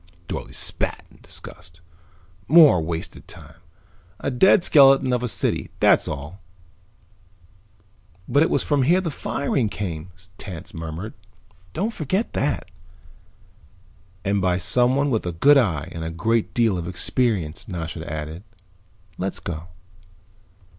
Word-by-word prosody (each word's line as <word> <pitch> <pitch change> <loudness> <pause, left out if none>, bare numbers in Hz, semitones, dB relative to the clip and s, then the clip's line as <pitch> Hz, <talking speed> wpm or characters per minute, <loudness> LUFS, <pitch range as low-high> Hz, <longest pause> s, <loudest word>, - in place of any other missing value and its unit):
Dorle - - -5
spat - - -2
in - - -21
disgust. 85 0 -7 0.7
"More 150 - +7
wasted 80 +1 -5
time. 75 0 -12 0.6
A - - -2
dead 180 +8 +5
skeleton 135 -4 +5
of 125 - 0
a 125 - -1
city, - - 0
that's - - +4
all." 75 +8 -6 1.9
"But 140 +4 +3
it 160 - +3
was - - +1
from 145 -2 +1
here 170 +8 +4
that - - -4
the - - -2
firing 135 -5 -1
came," 90 -5 -5 0.3
Tance 90 -5 -9
murmured. 80 +6 -6 0.6
"Don't 215 +6 -2
forget 185 - -2
that." 140 +1 -2 1.5
"And 100 0 +1
by 90 -1 +1
someone 125 +9 +2
with 110 -6 -1
a 90 - -3
good 140 - +6
eye 80 - -1
and 80 - -6
a 80 - -3
great 110 +7 -1
deal 115 -6 +2
of 85 - -5
experience," 90 -3 -1
Nasha 85 -5 -6
added. 80 +2 -5 0.8
"Let's 95 +1 -3
go." 85 0 -6
100 Hz, 135 wpm, -23 LUFS, 85-135 Hz, 1.9 s, More